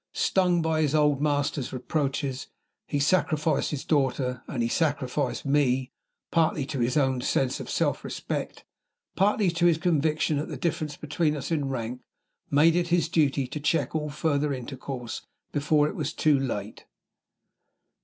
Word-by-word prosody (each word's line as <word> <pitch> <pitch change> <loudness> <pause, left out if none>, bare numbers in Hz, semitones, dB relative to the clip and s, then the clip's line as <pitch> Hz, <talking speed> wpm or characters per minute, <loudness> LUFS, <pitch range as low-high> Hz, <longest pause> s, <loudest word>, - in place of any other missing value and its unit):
Stung 180 -3 +2
by 160 -1 +1
his 150 -1 +1
old 150 -2 +3
master's 145 -2 0
reproaches, 135 0 -2 0.4
he 145 - -1
sacrificed 155 0 +2
his 145 -3 -4
daughter 130 -4 0
and 125 -5 -2
he - - +1
sacrificed 145 0 -1
me 135 -2 +2 0.4
partly 160 -4 +2
to 140 -1 -4
his 120 +4 +1
own 130 -3 +2
sense 130 +1 0
of - - -7
self - - 0
respect, - - -5 0.5
partly 200 -1 +3
to 170 +1 +2
his 165 -2 +4
conviction 155 -2 +1
that 150 - -2
the - - -5
difference 160 -4 -2
between 150 +1 0
us 140 - -5
in 145 -4 0
rank 125 -1 -4 0.5
made 155 +4 +5
it 175 -1 +1
his 170 -1 +2
duty 145 -4 +2
to 140 +4 -6
check 145 -2 0
all 150 -1 -1
further 145 0 0
intercourse 130 -1 -5 0.3
before 150 +1 +2
it 175 - -5
was 155 -7 -3
too 150 -3 +3
late. 110 -6 -4
145 Hz, 155 wpm, -27 LUFS, 135-160 Hz, 0.5 s, made